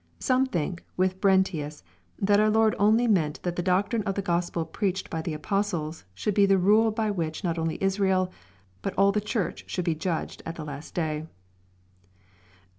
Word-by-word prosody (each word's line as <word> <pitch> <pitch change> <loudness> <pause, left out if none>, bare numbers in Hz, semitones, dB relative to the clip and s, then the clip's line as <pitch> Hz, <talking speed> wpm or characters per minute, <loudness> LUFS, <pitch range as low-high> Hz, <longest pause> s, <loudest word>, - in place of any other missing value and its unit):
Some 260 +1 +2
think, 170 - -3
with 185 +1 0
Brent 190 -1 +4
ius, 150 - -5 0.3
that 205 +1 +3
our 215 0 +4
Lord 220 0 +3
only 220 +4 +4
meant 165 -8 +1
that 175 -1 -2
the 175 - -1
doctrine 195 +5 +1
of 195 -2 -2
the 200 - -2
Grospel 170 -2 -1
preached 190 +3 -2
by 160 - -2
the 160 -1 -3
apostles, 165 - -2
should 210 - -1
be 200 0 +4
the 195 0 +4
rule 210 +5 +4
by 220 -1 -1
which 160 -5 -3
not 170 -2 -1
only 160 0 -1
Israel, 190 -1 +1 0.5
but - - -3
all 195 +1 +5
the 210 +1 0
Church 210 -2 -2
should 180 - -3
be 170 - +2
judged 160 +1 -3
at 165 - -6
the 155 - -6
last 145 0 -8
day. 155 -2 -2
185 Hz, 190 wpm, -27 LUFS, 165-205 Hz, 0.5 s, all